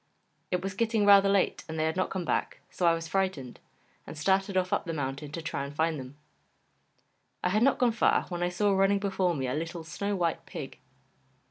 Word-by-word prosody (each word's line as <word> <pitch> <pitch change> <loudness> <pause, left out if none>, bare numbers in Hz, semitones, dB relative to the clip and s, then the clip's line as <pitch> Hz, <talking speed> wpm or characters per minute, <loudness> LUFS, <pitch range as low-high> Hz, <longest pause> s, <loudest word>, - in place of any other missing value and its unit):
It 180 0 -1
was 195 0 -3
getting 225 0 +1
rather 200 -1 +7
late, 195 -1 +1
and 160 - -4
they 155 - +1
had 160 0 0
not 185 - 0
come 185 -2 -3
back, - - -1
so 175 - 0
I 165 - +5
was 165 0 -5
frightened, 185 -9 -2 0.5
and - - -8
started 190 +4 +1
off 185 0 0
up - - 0
the 165 - -3
mountain 140 0 -4
to 165 - -5
try 140 - -3
and 140 +1 -7
find 160 -1 0
them. 130 +2 -10 1.3
I 180 - +2
had 210 +4 +1
not 275 +3 +4
gone 245 -2 +3
far 225 - +2
when 175 -1 -4
I 175 - +1
saw 200 +3 +1
running 195 +1 +3
before 190 -3 0
me 135 -2 -2
a 125 - -2
little 165 +3 -4
snow 200 +5 -3
white 170 -3 -1
pig. - - -7
180 Hz, 220 wpm, -29 LUFS, 160-195 Hz, 1.3 s, rather